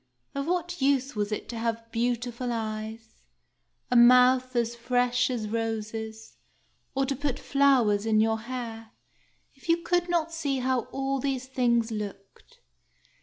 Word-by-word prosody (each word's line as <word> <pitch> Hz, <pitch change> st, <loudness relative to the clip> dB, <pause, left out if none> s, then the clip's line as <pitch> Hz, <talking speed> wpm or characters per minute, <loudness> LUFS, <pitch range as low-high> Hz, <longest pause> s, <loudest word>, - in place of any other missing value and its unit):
Of 280 Hz, +1 st, -3 dB
what 350 Hz, -1 st, -2 dB
use 270 Hz, -1 st, +2 dB
was 205 Hz, 0 st, -1 dB
it 210 Hz, -, -3 dB
to 235 Hz, -, -5 dB
have 230 Hz, 0 st, -3 dB
beautiful 240 Hz, +1 st, -1 dB
eyes, 220 Hz, 0 st, -5 dB, 0.7 s
a -, -, +2 dB
mouth 250 Hz, +1 st, +6 dB
as 235 Hz, 0 st, 0 dB
fresh 245 Hz, +1 st, +1 dB
as 235 Hz, -4 st, -2 dB
roses, 220 Hz, 0 st, -4 dB, 0.6 s
or 270 Hz, 0 st, +2 dB
to 275 Hz, +1 st, -1 dB
put 280 Hz, -1 st, -2 dB
flowers 245 Hz, -7 st, +3 dB
in 215 Hz, -1 st, +3 dB
your 220 Hz, 0 st, +2 dB
hair, 230 Hz, -2 st, -6 dB, 0.6 s
if 270 Hz, +4 st, -16 dB
you 335 Hz, 0 st, +3 dB
could 350 Hz, 0 st, +1 dB
not 335 Hz, -1 st, 0 dB
see 285 Hz, -5 st, -1 dB
how 255 Hz, -1 st, 0 dB
all 270 Hz, 0 st, -1 dB
these 265 Hz, -1 st, -2 dB
things 240 Hz, -3 st, +1 dB
looked? 210 Hz, -, -8 dB
245 Hz, 145 wpm, -27 LUFS, 225-270 Hz, 0.7 s, mouth